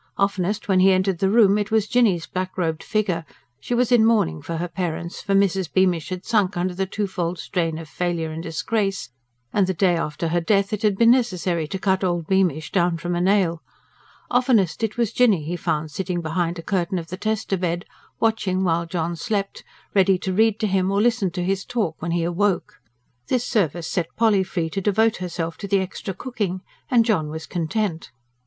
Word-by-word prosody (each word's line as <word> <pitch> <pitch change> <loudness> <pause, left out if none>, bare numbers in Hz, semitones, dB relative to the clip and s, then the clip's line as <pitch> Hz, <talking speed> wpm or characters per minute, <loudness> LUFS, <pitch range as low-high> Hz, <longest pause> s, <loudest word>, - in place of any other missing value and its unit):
Oftenest 200 +1 0
when 190 -2 +3
he 190 +1 +6
entered 185 -1 +1
the 190 - +2
room 210 -2 +5
it 205 0 -2
was 220 -2 +2
Jinny's 210 -10 +2
black 185 0 -4
robed 160 -3 -1
figure 200 -6 -1 0.4
she 240 - -2
was 250 0 +1
in 240 -3 +6
mourning 215 - +2
for 165 - -4
her 175 +2 -2
parents; 170 -1 -4
for 195 - 0
Mrs. 195 -3 +2
Beamish 180 -4 +2
had 185 0 -5
sunk 205 -5 +1
under 180 +1 -1
the 190 +1 -2
twofold 185 -3 -2
strain 165 -2 -2
of 165 -1 -8
failure 170 0 -2
and 160 +1 -5
disgrace, 195 - -2 0.4
and 200 -3 +3
the 190 - -1
day 180 0 +3
after 165 0 -2
her 175 +1 +1
death 200 +3 +1
it 210 - -2
had 210 -3 +2
been 230 +1 +6
necessary 180 -10 +1
to 190 - -4
cut 190 0 0
old 175 -3 0
Beamish 180 -4 +1
down 175 -2 +2
from 175 +2 -3
a 175 - 0
nail 180 -3 +2 0.7
oftenest 240 -9 +2
it 225 0 -2
was 235 -2 0
Jinny 215 -10 +3
he 165 +4 -3
found 155 -2 -2
sitting 180 +3 -2
behind 170 +1 -1
a 165 - -7
curtain 185 -1 -1
of 165 -2 -6
the 185 - -4
tester 215 -1 -1
bed, 175 -1 -2 0.3
watching 200 -4 +1
while 170 -1 +1
John 170 0 -2
slept, 200 0 -3 0.3
ready 195 -1 +4
to 185 +1 -3
read 220 +1 +3
to - - +2
him 190 -2 +1
or 200 - 0
to - - +3
listen 235 -5 +2
to 175 +1 -4
his 190 +1 -1
talk 215 -10 -2
when 170 - -3
he 170 0 0
awoke. 180 +3 -1 0.5
This 250 -2 0
service 175 - 0
set 170 0 -3
Polly 220 -4 +3
free 170 -3 -3
to 195 - -2
devote 220 +3 +2
herself 170 -2 -4
to 200 - -5
the 200 - +3
extra 190 0 -4
cooking; 205 -6 -3 0.3
and 235 -2 +4
John 180 -10 +1
was 160 +1 -6
content. 170 +1 -2
185 Hz, 205 wpm, -23 LUFS, 170-205 Hz, 0.7 s, he